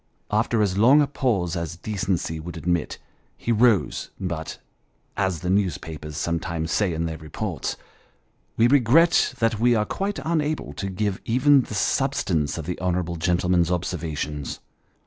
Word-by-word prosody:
After 110 +1 +2
as 95 -1 0
long 130 +7 +7
a - - +2
pause 110 - -1
as 85 -2 -4
decency 90 -5 -2
would 85 +1 -7
admit, 85 -1 -1 0.4
he 120 - -2
rose, 115 -2 +2
but, 85 -4 -4 0.6
as 95 -5 -1
the 90 - -2
newspapers 80 -6 -2
sometimes 85 -1 -2
say 100 -1 +1
in 85 0 -2
their 80 -1 -4
reports, 80 -2 -4 0.4
" - - -42
we 115 - +5
regret 145 +6 +4
that 115 -2 +1
we 120 +1 +4
are 105 -1 +1
quite 195 - -3
unable 155 - -1
to 95 +7 -4
give 95 +1 -2
even 135 +4 +4
the 110 - -7
substance 100 - 0
of 80 - -5
the 90 +1 -4
honourable 90 -2 -1
gentleman's 90 0 +2
observations." 80 -5 -3
90 Hz, 150 wpm, -24 LUFS, 85-115 Hz, 0.6 s, long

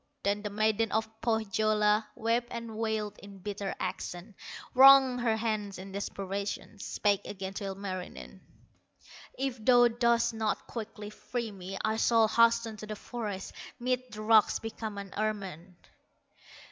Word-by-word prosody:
Then 200 +1 +1
the 210 - -4
maiden 215 +1 +1
of 220 0 -2
Pohyola 215 -1 +2
Wept 235 +1 0
and 230 -2 -6
wailed 215 -2 -2
in 200 -1 -12
bitter 200 0 -4
accents, 185 +2 -5 0.4
Wrung 265 -1 +8
her 230 -2 +1
hands 215 -3 -2
in 190 +1 -9
desperation, 200 +1 -4
Spake 200 0 0
again 190 -1 -6
to 200 - -5
Ilmarinen; 190 -2 -6 1.0
"If 255 -4 -3
thou 245 0 +6
dost 235 0 +2
not 220 -1 -1
quickly 215 -2 -7
free 235 +1 -4
me, 195 0 -7
I 220 0 0
shall 225 -1 +4
hasten 230 0 +3
to 215 - -8
the 215 - -4
forest, 210 -4 -5 0.3
Mid 250 +1 0
the 215 0 -7
rocks 215 -1 +5
become 220 -2 -6
an 200 -1 -7
ermine!" 195 -5 -3
215 Hz, 140 wpm, -30 LUFS, 200-230 Hz, 1.0 s, Wrung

